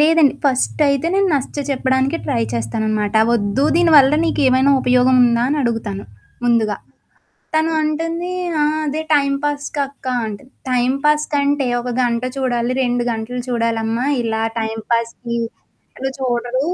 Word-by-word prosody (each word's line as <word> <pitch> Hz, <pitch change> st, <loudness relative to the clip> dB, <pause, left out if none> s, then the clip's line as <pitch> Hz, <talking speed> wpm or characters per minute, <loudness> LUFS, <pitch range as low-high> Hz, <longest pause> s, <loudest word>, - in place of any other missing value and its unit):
లేదండి. 310 Hz, -2 st, +4 dB
ఫస్టయితే, 280 Hz, +2 st, +1 dB
నేను 390 Hz, 0 st, +2 dB
నచ్చ 275 Hz, 0 st, -3 dB
చెప్పడానినికే 265 Hz, +3 st, 0 dB
ట్రై 115 Hz, -, 0 dB
చేస్తాననమాట. 210 Hz, -, -1 dB, 0.2 s
ఒద్దు, 210 Hz, +4 st, 0 dB
దీనివల్ల 305 Hz, -5 st, +6 dB
నీకేమైనా 270 Hz, -4 st, +3 dB
ఉపయోగం 250 Hz, +1 st, +3 dB
ఉందా? 235 Hz, 0 st, +2 dB
అనడుగుతాను. 230 Hz, -, -2 dB, 0.4 s
ముందుగా. 230 Hz, -3 st, +2 dB, 0.8 s
తను 315 Hz, +1 st, +2 dB
అంటుంది 330 Hz, +3 st, -2 dB, 0.3 s
ఆ! -, -, +4 dB, 0.2 s
అదే, 300 Hz, +2 st, -2 dB
టైంపాస్‌కక్క 285 Hz, 0 st, -2 dB, 0.2 s
అంట 210 Hz, -2 st, -6 dB, 0.3 s
టైంపాస్ 275 Hz, +5 st, +1 dB
కంటే 285 Hz, -1 st, +1 dB
ఒక 250 Hz, -, -5 dB
గంట 235 Hz, -1 st, 0 dB
చూడాలి, 245 Hz, -2 st, -1 dB
2 245 Hz, -1 st, 0 dB
గంటలు 230 Hz, +2 st, -4 dB
చూడాలమ్మా. 230 Hz, 0 st, -1 dB, 0.2 s
ఇలా 225 Hz, -1 st, -2 dB, 0.2 s
టైంపాస్‌కి, 230 Hz, +2 st, -2 dB, 0.6 s
ఇలా 265 Hz, -, -2 dB
చూడరు. 245 Hz, 0 st, -1 dB
255 Hz, 115 wpm, -18 LUFS, 235-285 Hz, 0.8 s, దీనివల్ల